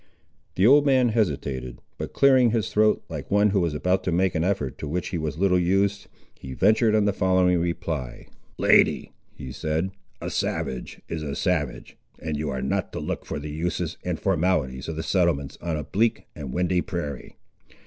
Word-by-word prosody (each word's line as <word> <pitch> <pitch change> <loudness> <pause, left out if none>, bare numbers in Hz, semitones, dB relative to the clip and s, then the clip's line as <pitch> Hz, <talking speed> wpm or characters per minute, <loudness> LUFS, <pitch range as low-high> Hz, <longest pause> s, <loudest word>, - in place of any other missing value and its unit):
The 95 - +3
old 140 +5 +7
man 130 -4 +3
hesitated; 70 - -2 0.2
but - - -4
clearing 130 -3 +5
his 115 -2 0
throat, 110 0 +3
like 75 -4 -7
one 105 +1 +3
who 100 - +2
was 85 -4 0
about 90 +5 +1
to 90 - 0
make 90 +2 +2
an 80 - 0
effort 85 -8 -1
to 75 - -5
which 85 +4 -2
he 85 - -3
was 75 -1 -3
little 90 0 +3
used, 95 +3 +1 0.3
he 65 - -9
ventured 110 - +3
on 105 -1 +3
the 100 - +2
following 95 -1 +2
reply— 80 -6 -3 0.3
"Lady," - - +3 0.2
he 65 -3 -8
said, 80 +7 -2 0.3
"a - - -5
savage 65 -2 -3
is 80 - -4
a 70 -2 -4
savage, - - -2 0.2
and 80 -1 -4
you 75 0 -2
are 65 -2 -3
not - - -1
to - - -3
look - - -4
for - - -3
the 75 +1 -6
uses 85 +2 -3
and 90 -3 -3
formalities 80 -8 0
of 80 - -4
the 80 - -4
settlements 85 -7 0
on 85 -2 -2
a 75 - -4
bleak 110 +9 0
and 70 -4 -6
windy 90 +2 +1
prairie. 75 -8 -5
85 Hz, 190 wpm, -25 LUFS, 75-100 Hz, 0.3 s, old